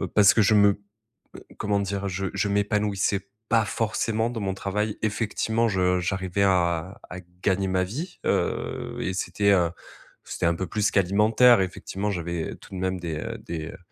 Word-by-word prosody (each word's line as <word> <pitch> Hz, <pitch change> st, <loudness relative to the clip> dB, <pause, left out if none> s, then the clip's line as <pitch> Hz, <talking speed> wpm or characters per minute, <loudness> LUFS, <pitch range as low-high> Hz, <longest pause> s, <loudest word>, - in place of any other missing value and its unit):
Heu, 95 Hz, -, -2 dB
parce 100 Hz, +2 st, +5 dB
que 110 Hz, -, +4 dB
je 105 Hz, +2 st, +4 dB
me 100 Hz, -1 st, +6 dB, 0.7 s
heu, -, -, -11 dB
comment 105 Hz, -1 st, 0 dB
dire, 100 Hz, 0 st, -2 dB
je 95 Hz, +1 st, -2 dB
je -, -, 0 dB
m'épanouissais 100 Hz, -1 st, 0 dB, 0.2 s
pas 115 Hz, -2 st, +3 dB
forcément 110 Hz, +1 st, -1 dB
dans 120 Hz, -2 st, -4 dB
mon 95 Hz, -2 st, -1 dB
travail. 105 Hz, +2 st, -2 dB
Effectivement, 110 Hz, +1 st, 0 dB
je 90 Hz, -3 st, +2 dB
j'arrivais 95 Hz, +1 st, -1 dB
à 90 Hz, -1 st, +1 dB
à 90 Hz, -, -7 dB, 0.2 s
gagner 95 Hz, 0 st, +1 dB
ma 95 Hz, 0 st, +1 dB
vie, 150 Hz, -, -6 dB
heu, -, -, -1 dB
et 95 Hz, -, -2 dB
c'était, 100 Hz, +2 st, 0 dB
heu, 90 Hz, -4 st, +3 dB, 0.5 s
c'était -, -, -3 dB
un 85 Hz, 0 st, +3 dB
peu 95 Hz, +2 st, -3 dB
plus 105 Hz, -1 st, +1 dB
qu'alimentaire. 105 Hz, +5 st, +5 dB
Effectivement, 95 Hz, +2 st, -3 dB
j'avais 85 Hz, -3 st, -3 dB
tout -, -, -15 dB
de 95 Hz, -, -4 dB
même 95 Hz, 0 st, -1 dB
des, 85 Hz, -3 st, -3 dB
heu, 115 Hz, +8 st, -5 dB
des, 85 Hz, -6 st, -5 dB
heu, -, -, -9 dB
100 Hz, 180 wpm, -25 LUFS, 95-105 Hz, 0.7 s, me